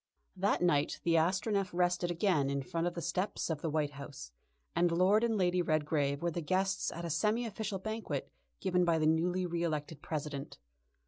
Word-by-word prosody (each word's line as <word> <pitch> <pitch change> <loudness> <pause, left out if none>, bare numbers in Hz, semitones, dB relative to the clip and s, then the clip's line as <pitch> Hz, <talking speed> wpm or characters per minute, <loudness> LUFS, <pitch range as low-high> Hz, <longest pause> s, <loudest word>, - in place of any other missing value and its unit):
That 190 -1 +1
night 150 -3 +2
the 170 - +2
Astronef 190 +4 +2
rested 175 0 +1
again 170 -5 +2
in 140 0 -1
front 165 +5 -1
of 175 - -3
the 170 - -4
steps 180 +1 -1
of 150 -2 -3
the 165 - -1
White 150 -1 0
House, 140 - -9 0.4
and 170 0 +3
Lord 190 +6 +4
and 225 -2 +2
Lady 180 -1 +2
Redgrave 150 -3 0
were 170 - +1
the 170 - -3
guests 190 +4 0
at 170 +1 -5
a - - -3
semi 215 +9 +1
official 215 -2 -3
banquet 220 +3 -4 0.3
given 180 -2 +2
by 170 -2 +3
the 155 - +1
newly 175 +4 +2
re 170 -1 -2
elected 155 -2 -2
President. 145 -3 -4
170 Hz, 190 wpm, -33 LUFS, 155-185 Hz, 0.4 s, Lord